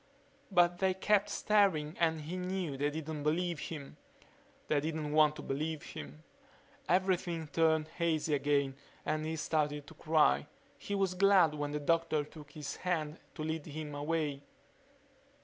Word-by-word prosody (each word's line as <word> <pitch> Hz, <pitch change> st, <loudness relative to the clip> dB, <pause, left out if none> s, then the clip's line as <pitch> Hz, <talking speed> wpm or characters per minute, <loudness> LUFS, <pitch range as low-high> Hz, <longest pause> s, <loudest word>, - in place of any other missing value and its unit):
But 175 Hz, -2 st, +4 dB
they 190 Hz, -1 st, +2 dB
kept 205 Hz, +1 st, +2 dB
staring 185 Hz, -7 st, +2 dB
and 160 Hz, -2 st, +2 dB
he 160 Hz, +4 st, -5 dB
knew 180 Hz, -4 st, -2 dB
they 145 Hz, +2 st, 0 dB
didn't 155 Hz, 0 st, -5 dB
believe 165 Hz, +2 st, 0 dB
him. 150 Hz, -4 st, -7 dB, 0.7 s
They 150 Hz, -, +2 dB
didn't 155 Hz, 0 st, -3 dB
want 150 Hz, 0 st, +5 dB
to -, -, -8 dB
believe 155 Hz, +3 st, -2 dB
him... 75 Hz, +1 st, -9 dB, 0.7 s
Everything 180 Hz, -2 st, +1 dB
turned 160 Hz, 0 st, +2 dB
hazy 160 Hz, -2 st, 0 dB
again 140 Hz, -1 st, +1 dB, 0.3 s
and 155 Hz, 0 st, -1 dB
he 160 Hz, -, -2 dB
started 150 Hz, -2 st, -1 dB
to 160 Hz, -, -12 dB
cry. 155 Hz, -1 st, +3 dB, 0.3 s
He 205 Hz, -, -3 dB
was 195 Hz, -2 st, +1 dB
glad 185 Hz, -4 st, +5 dB
when 145 Hz, -1 st, -2 dB
the 150 Hz, +1 st, -2 dB
doctor 165 Hz, 0 st, +1 dB
took 150 Hz, 0 st, -12 dB
his 150 Hz, -2 st, -5 dB
hand 160 Hz, -4 st, -2 dB, 0.2 s
to 155 Hz, -, -4 dB
lead 160 Hz, -1 st, -3 dB
him 150 Hz, 0 st, -6 dB
away 145 Hz, -1 st, -1 dB
155 Hz, 150 wpm, -33 LUFS, 150-175 Hz, 0.7 s, want